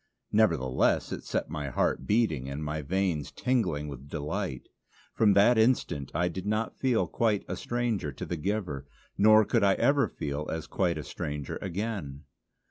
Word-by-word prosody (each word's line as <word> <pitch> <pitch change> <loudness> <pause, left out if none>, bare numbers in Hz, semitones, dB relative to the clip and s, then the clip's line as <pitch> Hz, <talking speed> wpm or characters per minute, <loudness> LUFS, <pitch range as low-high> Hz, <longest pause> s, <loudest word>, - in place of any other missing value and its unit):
Nevertheless 80 -12 +2
it - - -5
set - - -2
my 75 -2 -3
heart - - 0
beating 95 - +1
and 70 +3 -4
my 75 +1 -2
veins 85 -1 -1
tingling 90 - 0
with 70 -1 -9
delight. 75 -1 -4 0.5
From 105 -2 +4
that 110 +4 +5
instant 110 - +1
I 85 +2 +2
did 90 +3 -5
not 110 +2 -1
feel 120 -8 +2
quite 105 +3 0
a - - -3
stranger 120 -10 -2
to - - -6
the 85 - -3
giver; 85 -7 -3 0.3
nor 110 +1 +6
could 115 0 +2
I 100 -1 +5
ever 140 0 +3
feel 75 -3 -4
as 80 -1 -3
quite 85 -2 0
a 75 - -4
stranger 75 0 -5
again. 95 -7 -4
90 Hz, 165 wpm, -29 LUFS, 75-110 Hz, 0.5 s, nor